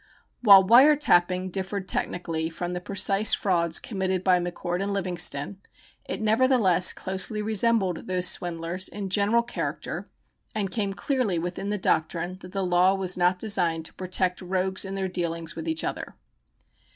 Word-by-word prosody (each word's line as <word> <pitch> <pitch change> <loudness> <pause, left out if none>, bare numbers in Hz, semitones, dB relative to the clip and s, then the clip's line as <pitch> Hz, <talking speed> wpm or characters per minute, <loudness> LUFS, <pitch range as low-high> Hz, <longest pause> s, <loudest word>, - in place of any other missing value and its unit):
While 200 -5 +8
"wire 255 +9 +6
tapping" 185 -9 +1
differed 190 +1 -3
technically 165 -4 -2
from 175 +2 -5
the 180 - -4
precise 200 +2 +2
frauds 170 -4 +1
committed 190 -3 -2
by 185 -1 +3
McCord 175 +1 -4
and 200 +1 -2
Livingston, 180 -3 -1 0.5
it - - -5
nevertheless 220 -5 +3
closely 190 +3 -2
resembled 210 -3 0
those 180 -1 +1
swindlers 175 +1 -1
in 200 -2 -6
general 210 +4 +2
character 240 - -5 0.5
and 200 -3 -2
came 200 -2 -3
clearly 250 - -1
within 175 +4 -4
the 210 - -1
doctrine 175 0 -1
that 180 -1 -12
the 195 -1 -2
law 180 +2 +3
was 185 -1 +1
not 180 +1 +2
designed 175 -6 0
to - - -7
protect 185 0 -2
"rogues 185 +1 0
in 195 0 -5
their 190 -1 -2
dealings 170 -2 -4
with 165 0 -7
each 160 0 0
other." - - -5
185 Hz, 155 wpm, -25 LUFS, 175-200 Hz, 0.5 s, While